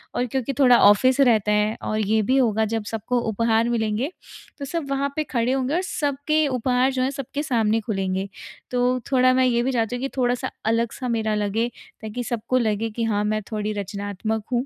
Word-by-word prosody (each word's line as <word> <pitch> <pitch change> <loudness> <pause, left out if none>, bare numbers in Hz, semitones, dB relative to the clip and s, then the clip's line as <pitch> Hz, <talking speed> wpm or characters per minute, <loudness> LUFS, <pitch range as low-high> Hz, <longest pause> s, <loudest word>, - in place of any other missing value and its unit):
और 245 - +1
क्योंकि 265 +2 -2
थोड़ा 250 -3 +7
ऑफिस 255 +6 +3
रहता 220 -6 +4
है 210 +1 +2
और 215 - -2
ये 215 +1 +2
भी 260 +6 +1
होगा 220 -4 +2
जब 225 0 -2
सबको 230 +3 -1
उपहार 225 +1 +1
मिलेंगे, 230 +4 -1 0.5
तो 280 - -4
सब 300 -1 -4
वहाँ 275 +1 0
पे 310 - 0
खड़े 245 -4 -1
होंगे 265 +1 0
और 360 - +1
सबके 305 -2 0
उपहार 255 0 +1
जो 260 -1 -1
हैं 265 - 0
सबके 280 +1 -5
सामने 225 -4 +1
खुलेंगे, 195 -2 -2 0.4
तो 250 0 +1
थोड़ा 255 -1 +4
मैं 260 0 +3
ये 240 -1 +2
भी 265 - 0
चाहती 235 -1 0
हूँ 245 - -5
कि 270 - -2
थोड़ा-सा 245 -1 0
अलग 230 +1 +1
सा 255 - -5
मेरा 220 -2 0
लगे 210 +3 0 0.3
ताकि 220 +3 -5
सबको 240 +1 -1
लगे 225 -2 0
कि 230 +2 -4
हाँ, 210 -2 0
मैं 215 0 0
थोड़ी 215 -1 -2
रचनात्मक 205 +2 -4
हूँ। 245 +2 +1
235 Hz, 205 wpm, -23 LUFS, 215-260 Hz, 0.5 s, थोड़ा